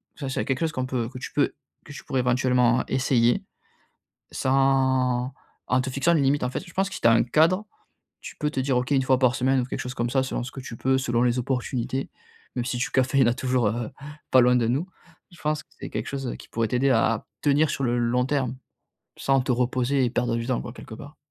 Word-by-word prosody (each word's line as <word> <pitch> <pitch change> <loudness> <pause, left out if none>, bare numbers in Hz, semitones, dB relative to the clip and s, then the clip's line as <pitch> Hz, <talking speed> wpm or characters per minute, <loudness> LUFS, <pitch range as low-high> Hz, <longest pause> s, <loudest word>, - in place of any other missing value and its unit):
ça 140 - -6
c'est 135 - -2
à - - -3
quelque 135 -2 -1
chose 165 -1 +1
qu'on 130 -3 -2
peut 120 -3 -2
que 125 0 -9
tu - - -7
peux 145 - +1 0.3
que 145 - -10
tu - - -9
pourrais 130 - 0
éventuellement 125 -1 +2
essayer, 120 -2 +2 0.9
sans 130 -1 +2 0.4
en 125 - +3
te 130 - -4
fixant 140 +6 +2
les 160 - +3
limites. 140 0 +2
En 125 - -1
fait, - - -4
je 170 - -13
pense 195 +1 +1
que - - -9
si - - -8
tu - - +6
as 115 - +6
un 115 - +4
cadre, 165 - +3 0.6
tu - - -9
peux 150 - -1
te 135 - -2
dire: 130 -1 +1
«OK, 125 +3 -2
1 135 -2 +4
fois 130 0 +3
par 130 -1 +3
semaine», 130 0 +2
ou - - -2
quelque 125 - -5
chose 125 +1 -5
comme 120 0 -1
ça, 135 - +2
selon 130 -2 -3
ce 130 - -7
que - - -8
tu 125 - -8
peux, 130 0 +2
selon 120 -3 0
les 125 0 +2
opportunités, 130 +1 -2 0.5
même 125 -2 -2
si 125 - -2
du 125 - -1
café, 130 +1 +2
il - - +6
y - - +3
en - - +3
a - - 0
toujours, 125 -3 +1
heu, 115 +1 -2 0.4
pas 130 - +7
loin 125 0 +4
de 120 -2 +2
nous. 140 +10 0 0.4
Je 170 - -16
pense 150 0 -1
que - - -57
c'est - - -6
quelque - - -4
chose, 135 -2 -4
heu, - - -3
qui - - -13
pourrait 115 0 -1
t'aider 130 +2 +2
à - - +2 0.2
tenir 145 +1 +3
sur 140 - -2
le 120 -1 +1
long 120 +1 +1
terme, 130 -2 -1 0.6
sans 135 -1 +2
te 130 - -1
reposer 125 +2 +1
et - - 0
perdre 120 -1 0
du 115 - -3
temps, 130 - 0
quoi, 120 - -8
quelque 110 - -10
part. 145 +5 -12
130 Hz, 260 wpm, -25 LUFS, 125-135 Hz, 0.9 s, pas